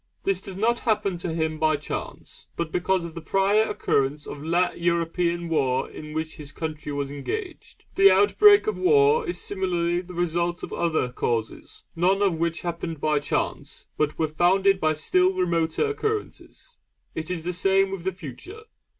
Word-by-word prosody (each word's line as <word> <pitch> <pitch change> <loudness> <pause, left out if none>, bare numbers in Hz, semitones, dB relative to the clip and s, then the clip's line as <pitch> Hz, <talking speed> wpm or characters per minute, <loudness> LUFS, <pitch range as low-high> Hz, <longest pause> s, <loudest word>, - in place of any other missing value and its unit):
This 195 -1 0
does 190 -1 -8
not 235 +3 +1
happen 210 -5 0
to 175 - -3
him 160 -1 -2
by 155 -1 +2
chance, 145 - -7
but 170 -2 -3
because 180 +1 0
of 165 - -8
the 165 - -7
prior 195 +5 +2
occurrence 140 +2 0
of 145 - -8
la 175 +3 +1
European 170 0 -1
war 135 -6 0
in 150 0 -9
which 160 0 -4
his 145 -2 -7
country 155 -2 -5
was 140 -1 -3
engaged. 360 - -6
The 390 +1 +7
outbreak 410 0 +6
of 430 - -2
war 430 +3 +4
is 355 - -3
similarly 175 -3 -1
the 180 0 -11
result 175 0 -1
of - - -6
other 160 -7 0
causes, 115 -2 -3
none 190 +4 +2
of 195 -3 +3
which 170 0 -1
happened 170 -2 -4
by 150 0 +1
chance, - - -3
but 150 0 -1
were 160 - +1
founded 190 +5 +3
by 155 -2 +1
still 180 +5 +2
remoter 170 - 0
occurrences. 430 +3 -5 0.4
It 160 +1 -5
is 175 -3 -3
the 180 +2 -2
same 195 +2 +2
with 195 -3 -5
the 190 - 0
Future. 185 - -10
175 Hz, 175 wpm, -25 LUFS, 155-195 Hz, 0.4 s, The